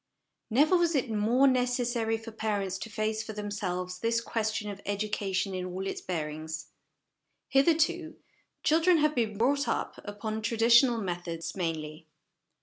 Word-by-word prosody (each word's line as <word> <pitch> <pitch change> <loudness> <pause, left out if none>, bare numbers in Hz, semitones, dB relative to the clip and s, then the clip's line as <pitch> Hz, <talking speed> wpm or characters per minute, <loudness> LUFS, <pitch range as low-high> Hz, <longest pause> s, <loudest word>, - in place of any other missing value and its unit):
Never 295 +10 +4
was 340 -2 +2
it 260 -4 0
more 225 +5 +3
necessary 245 -3 +1
for 225 +1 -9
parents 205 -4 -2
to 220 - -6
face 215 0 -1
for 220 - -7
themselves 185 -3 -3
this 230 +2 +1
question 220 -2 -2
of 200 0 -9
education 200 -2 -1
in 185 -1 -3
all 185 +1 -4
its 195 - -4
bearings. 155 -2 -4 0.8
Hitherto, 320 +3 +2 0.5
children 330 +3 +4
have 305 0 +3
been 220 -5 -1
brought 280 +5 +2
up - - -2
upon 215 +1 -4
traditional 235 +2 +5
methods 175 -4 -4
mainly. 160 -3 -4
220 Hz, 140 wpm, -29 LUFS, 190-245 Hz, 0.8 s, traditional